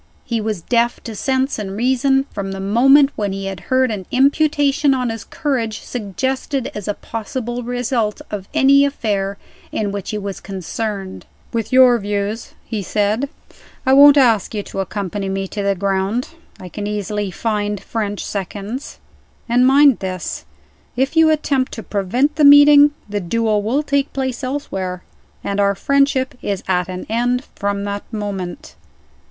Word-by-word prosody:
He 230 Hz, -3 st, -1 dB
was 210 Hz, -5 st, -3 dB
deaf 235 Hz, 0 st, +1 dB
to 225 Hz, -, -7 dB
sense 265 Hz, +3 st, 0 dB
and 195 Hz, -1 st, -5 dB
reason, 265 Hz, +3 st, +2 dB
from 195 Hz, -1 st, -4 dB
the 195 Hz, -, -6 dB
moment 270 Hz, +8 st, +5 dB
when 205 Hz, -2 st, -2 dB
he 195 Hz, 0 st, -5 dB
had 195 Hz, -2 st, -5 dB
heard 260 Hz, -1 st, +3 dB
an 195 Hz, -4 st, -5 dB
imputation 285 Hz, +1 st, +2 dB
on 250 Hz, -2 st, -1 dB
his 225 Hz, -1 st, -6 dB
courage 240 Hz, -7 st, -2 dB
suggested 260 Hz, +5 st, -3 dB
as 210 Hz, -2 st, -6 dB
a 205 Hz, -, -1 dB
possible 240 Hz, +2 st, -5 dB
result 245 Hz, -3 st, -1 dB
of 200 Hz, -2 st, -5 dB
any 280 Hz, -1 st, +5 dB
affair 205 Hz, -8 st, -1 dB, 0.3 s
in 205 Hz, -2 st, -2 dB
which 200 Hz, -1 st, -5 dB
he 215 Hz, -, -2 dB
was 200 Hz, -2 st, -5 dB
concerned. 195 Hz, +1 st, -5 dB, 0.3 s
"With 225 Hz, 0 st, -2 dB
your 255 Hz, -2 st, +6 dB
views," 205 Hz, +2 st, -3 dB
he 220 Hz, -3 st, -3 dB
said, 210 Hz, +7 st, 0 dB, 0.6 s
"I 260 Hz, -, +4 dB
won't 285 Hz, +1 st, +8 dB
ask 230 Hz, -6 st, +3 dB
you 205 Hz, -, -2 dB
to 195 Hz, -, -7 dB
accompany 195 Hz, 0 st, -3 dB
me 195 Hz, 0 st, -2 dB
to 210 Hz, -, -4 dB
the 200 Hz, 0 st, +1 dB
ground. 195 Hz, +5 st, -1 dB, 0.3 s
I 185 Hz, -, -9 dB
can 205 Hz, +3 st, -5 dB
easily 210 Hz, -1 st, -2 dB
find 205 Hz, +1 st, -2 dB
French 205 Hz, -2 st, -4 dB
seconds. 205 Hz, +6 st, -5 dB, 0.5 s
And 245 Hz, +2 st, +4 dB
mind 275 Hz, -1 st, +5 dB
this, 185 Hz, -2 st, -5 dB, 0.5 s
if 265 Hz, +5 st, 0 dB
you 320 Hz, -1 st, +6 dB
attempt 280 Hz, -4 st, 0 dB
to 225 Hz, -, -6 dB
prevent 245 Hz, +10 st, 0 dB
the 305 Hz, -, +3 dB
meeting, 290 Hz, 0 st, +8 dB, 0.2 s
the 205 Hz, 0 st, -3 dB
duel 215 Hz, +3 st, 0 dB
will 250 Hz, +8 st, 0 dB
take 280 Hz, -1 st, 0 dB
place 260 Hz, -1 st, -3 dB
elsewhere 195 Hz, -10 st, -4 dB, 0.4 s
and 200 Hz, 0 st, -2 dB
our 200 Hz, 0 st, +3 dB
friendship 275 Hz, +3 st, +1 dB
is 200 Hz, -2 st, -3 dB
at 180 Hz, -1 st, 0 dB
an 185 Hz, 0 st, -6 dB
end 245 Hz, +3 st, 0 dB
from 200 Hz, 0 st, -2 dB
that 200 Hz, +2 st, -5 dB
moment." 200 Hz, -5 st, -5 dB
220 Hz, 160 wpm, -19 LUFS, 200-265 Hz, 0.6 s, won't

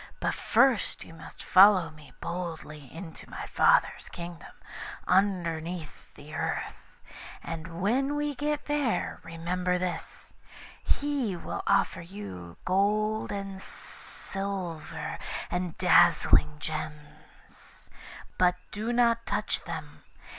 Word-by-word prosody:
But -, -, 0 dB
first 260 Hz, -7 st, +3 dB
you -, -, -12 dB
must 165 Hz, -, -11 dB
follow 185 Hz, -3 st, +7 dB
me 155 Hz, -4 st, -15 dB
boldly 160 Hz, -5 st, -5 dB
into 165 Hz, 0 st, -9 dB
my -, -, -6 dB
Father's -, -, +3 dB
Kingdom, 170 Hz, -1 st, -8 dB, 0.6 s
underneath 175 Hz, -4 st, 0 dB
the 150 Hz, +2 st, -12 dB
earth; -, -, -2 dB, 0.7 s
and 165 Hz, +1 st, -6 dB
when 270 Hz, +7 st, +2 dB
we 295 Hz, 0 st, 0 dB
get 295 Hz, +1 st, -1 dB
there, 290 Hz, -10 st, 0 dB
remember 180 Hz, +2 st, -1 dB
this 180 Hz, -1 st, -5 dB, 0.5 s
he 280 Hz, -9 st, 0 dB
will 170 Hz, -, -4 dB
offer 200 Hz, -3 st, +3 dB
you 95 Hz, -, -8 dB
gold 210 Hz, +3 st, +2 dB
and 195 Hz, -1 st, -5 dB
silver, 190 Hz, -8 st, -6 dB, 0.3 s
and 180 Hz, -2 st, -2 dB
dazzling 150 Hz, 0 st, +5 dB
gems, 150 Hz, -1 st, -8 dB, 0.5 s
but 180 Hz, -1 st, +5 dB, 0.2 s
do 215 Hz, +3 st, -2 dB
not 235 Hz, -1 st, +3 dB
touch -, -, 0 dB
them. -, -, -7 dB
180 Hz, 105 wpm, -29 LUFS, 165-210 Hz, 0.7 s, follow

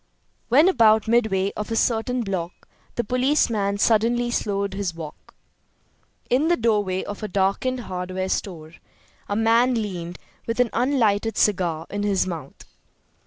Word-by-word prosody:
When 290 Hz, +8 st, +6 dB
about 220 Hz, -, +4 dB
midway 215 Hz, -4 st, +2 dB
of 210 Hz, -, -5 dB
a 225 Hz, -, -2 dB
certain 240 Hz, +2 st, 0 dB
block 180 Hz, -4 st, -5 dB, 0.3 s
the 240 Hz, -, 0 dB
policeman 235 Hz, -5 st, +1 dB
suddenly 235 Hz, +3 st, +2 dB
slowed 200 Hz, -3 st, -1 dB
his 195 Hz, -4 st, -3 dB
walk. 155 Hz, -2 st, -10 dB, 0.9 s
In 270 Hz, +6 st, +2 dB
the 345 Hz, -, +3 dB
doorway 205 Hz, -5 st, 0 dB
of 205 Hz, -, -7 dB
a 215 Hz, -, -3 dB
darkened 200 Hz, +7 st, 0 dB
hardware 185 Hz, -1 st, -4 dB
store 165 Hz, -6 st, -4 dB, 0.6 s
a 205 Hz, -, -1 dB
man 230 Hz, +3 st, +3 dB
leaned, 180 Hz, -6 st, -4 dB, 0.3 s
with 230 Hz, +1 st, -3 dB
an 250 Hz, -2 st, +2 dB
unlighted 225 Hz, -4 st, +1 dB
cigar 175 Hz, -6 st, +1 dB
in 205 Hz, -, -3 dB
his 200 Hz, -3 st, +1 dB
mouth. 165 Hz, -7 st, -7 dB
210 Hz, 140 wpm, -23 LUFS, 190-235 Hz, 0.9 s, When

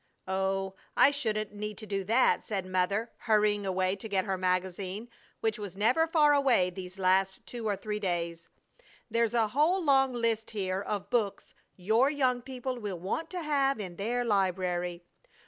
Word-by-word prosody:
"Oh, 190 Hz, 0 st, -1 dB, 0.2 s
I 285 Hz, -, +7 dB
shouldn't 215 Hz, -7 st, -2 dB
need 210 Hz, 0 st, -5 dB
to 220 Hz, -, -6 dB
do 195 Hz, -2 st, -2 dB
that!" 230 Hz, +6 st, +3 dB
said 195 Hz, -4 st, -3 dB
Mother, 185 Hz, +5 st, 0 dB
hurrying 210 Hz, -2 st, +2 dB
away 185 Hz, 0 st, +1 dB
to 220 Hz, +3 st, -6 dB
get 195 Hz, -1 st, +1 dB
her 195 Hz, -2 st, -1 dB
magazine, 185 Hz, +3 st, -2 dB, 0.3 s
which 220 Hz, -1 st, 0 dB
was 195 Hz, -3 st, -7 dB
never 250 Hz, +11 st, +3 dB
far 305 Hz, -3 st, +4 dB
away 255 Hz, -10 st, +3 dB
these 185 Hz, +1 st, -8 dB
last 190 Hz, 0 st, +1 dB
two 235 Hz, -2 st, -5 dB
or 205 Hz, -, +1 dB
three 210 Hz, +1 st, -4 dB
days. 170 Hz, -3 st, -3 dB, 0.6 s
"There's 230 Hz, +1 st, +1 dB
a 225 Hz, -2 st, +3 dB
whole 315 Hz, -, +2 dB
long 270 Hz, -3 st, +4 dB
list 230 Hz, -2 st, 0 dB
here 190 Hz, -3 st, -2 dB
of 205 Hz, -1 st, -4 dB
books 220 Hz, -5 st, -1 dB, 0.2 s
'your 220 Hz, +8 st, +3 dB
young 260 Hz, -4 st, +1 dB
people 255 Hz, 0 st, -5 dB
will 205 Hz, -5 st, -4 dB
want 210 Hz, -, -3 dB
to 360 Hz, -2 st, -4 dB
have 275 Hz, -4 st, +1 dB
in 180 Hz, -4 st, -6 dB
their 240 Hz, +4 st, -1 dB
library.' 180 Hz, -4 st, 0 dB
210 Hz, 170 wpm, -30 LUFS, 190-245 Hz, 0.6 s, I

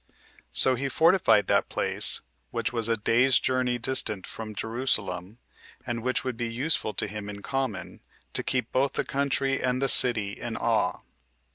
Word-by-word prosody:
So 130 Hz, -, +3 dB
he 135 Hz, +2 st, -3 dB
fortified 165 Hz, -, +3 dB
that -, -, +1 dB
place, -, -, +1 dB, 0.3 s
which 115 Hz, 0 st, -3 dB
was 115 Hz, -1 st, -1 dB
a 115 Hz, -, +1 dB
day's 120 Hz, +5 st, +3 dB
journey 125 Hz, -1 st, -1 dB
distant 110 Hz, -5 st, +1 dB
from 110 Hz, -1 st, -8 dB
Jerusalem, 110 Hz, -4 st, -2 dB, 0.5 s
and 120 Hz, -2 st, -4 dB
which 130 Hz, +2 st, -1 dB
would 130 Hz, -3 st, -4 dB
be 120 Hz, -1 st, -3 dB
useful 125 Hz, -3 st, -2 dB
to -, -, -1 dB
him 105 Hz, 0 st, -7 dB
in 100 Hz, 0 st, -9 dB
common, 135 Hz, -7 st, -4 dB, 0.3 s
to -, -, +2 dB
keep 125 Hz, -1 st, -2 dB
both 135 Hz, +2 st, 0 dB
the -, -, -2 dB
country 135 Hz, -1 st, -1 dB
and 125 Hz, 0 st, -1 dB
the 135 Hz, -, 0 dB
city 110 Hz, -6 st, +7 dB
in -, -, -6 dB
awe. -, -, 0 dB
120 Hz, 165 wpm, -26 LUFS, 110-130 Hz, 0.5 s, city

